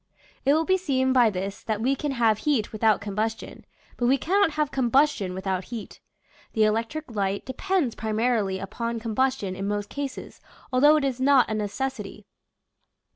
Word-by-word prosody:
It 280 Hz, +2 st, +5 dB
will 320 Hz, +1 st, +1 dB
be 375 Hz, +1 st, +2 dB
seen 260 Hz, -6 st, +1 dB
by 245 Hz, -3 st, +5 dB
this 195 Hz, 0 st, -4 dB
that 220 Hz, -2 st, -2 dB
we 260 Hz, +5 st, +1 dB
can 285 Hz, +1 st, -3 dB
have 225 Hz, -4 st, +2 dB
heat 265 Hz, -7 st, 0 dB
without 215 Hz, -1 st, +2 dB
combustion: 215 Hz, +2 st, -4 dB, 0.3 s
but 240 Hz, -, +1 dB
we 270 Hz, +2 st, +4 dB
cannot 375 Hz, +3 st, +2 dB
have 300 Hz, -1 st, -1 dB
combustion 260 Hz, -7 st, +2 dB
without 190 Hz, -1 st, -2 dB
heat. 230 Hz, -3 st, -8 dB, 0.5 s
The 220 Hz, -, +3 dB
electric 230 Hz, +7 st, -1 dB
light 200 Hz, -2 st, -2 dB
depends 305 Hz, -, -1 dB
primarily 220 Hz, -3 st, 0 dB
upon 230 Hz, +4 st, -4 dB
combustion 225 Hz, -3 st, -1 dB
in 195 Hz, +1 st, -4 dB
most 205 Hz, 0 st, -2 dB
cases, 285 Hz, -2 st, -6 dB, 0.3 s
although 290 Hz, +4 st, +6 dB
it 305 Hz, -, +1 dB
is 260 Hz, -2 st, -2 dB
not 265 Hz, -3 st, +4 dB
a -, -, 0 dB
necessity. 210 Hz, -1 st, -4 dB
235 Hz, 165 wpm, -25 LUFS, 210-275 Hz, 0.5 s, although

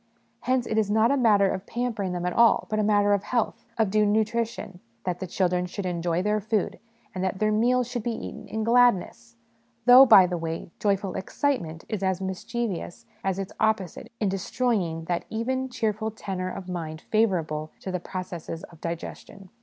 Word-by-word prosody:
Hence 255 Hz, -1 st, 0 dB
it 220 Hz, -, 0 dB
is 210 Hz, -2 st, 0 dB
not 220 Hz, +3 st, +3 dB
a -, -, +3 dB
matter 215 Hz, -6 st, +4 dB
of 190 Hz, 0 st, -3 dB
pampering 230 Hz, -6 st, -2 dB
them 180 Hz, 0 st, -3 dB
at 180 Hz, -, -1 dB
all, 235 Hz, -1 st, +4 dB
but 215 Hz, -, +1 dB
a -, -, +2 dB
matter 205 Hz, -1 st, +3 dB
of 200 Hz, -, +2 dB
health, 235 Hz, +2 st, -2 dB
of 220 Hz, -4 st, +2 dB
due 215 Hz, +1 st, +3 dB
nutrition, 215 Hz, -2 st, -1 dB, 0.2 s
that 180 Hz, -1 st, -2 dB
the 185 Hz, -, -4 dB
children 180 Hz, 0 st, 0 dB
should 190 Hz, +2 st, -5 dB
enjoy 175 Hz, 0 st, -1 dB
their 210 Hz, +1 st, +1 dB
food, 215 Hz, -1 st, -1 dB, 0.3 s
and 185 Hz, -1 st, -3 dB
that 190 Hz, 0 st, -1 dB
their 215 Hz, +2 st, +1 dB
meals 240 Hz, +3 st, +2 dB
should 245 Hz, -1 st, -3 dB
be 235 Hz, -, -2 dB
eaten -, -, -8 dB
in 220 Hz, 0 st, -3 dB
gladness; 220 Hz, -, +2 dB, 0.5 s
though, 250 Hz, +2 st, +10 dB
by 190 Hz, -5 st, +9 dB
the 180 Hz, -1 st, -2 dB
way, 165 Hz, 0 st, -5 dB
joyful 200 Hz, -2 st, 0 dB
excitement 190 Hz, -, -2 dB
is 215 Hz, -3 st, -3 dB
as 190 Hz, -2 st, 0 dB
mischievous 195 Hz, 0 st, -4 dB, 0.2 s
as 190 Hz, -1 st, 0 dB
its 195 Hz, -1 st, -5 dB
opposite 215 Hz, -5 st, -1 dB
in 210 Hz, -, +1 dB
destroy 215 Hz, +6 st, 0 dB
ing 165 Hz, -6 st, -1 dB
that 175 Hz, +1 st, -2 dB
even, 260 Hz, +4 st, -2 dB
cheerful 220 Hz, -2 st, -1 dB
tenor 190 Hz, -4 st, -4 dB
of 185 Hz, 0 st, -7 dB
mind 160 Hz, -3 st, -5 dB
favourable 165 Hz, -8 st, +1 dB
to 190 Hz, -, -5 dB
the 180 Hz, -, -2 dB
processes 175 Hz, -2 st, -6 dB
of 165 Hz, -, -17 dB
digestion. 180 Hz, +3 st, -7 dB
200 Hz, 190 wpm, -26 LUFS, 180-225 Hz, 0.5 s, though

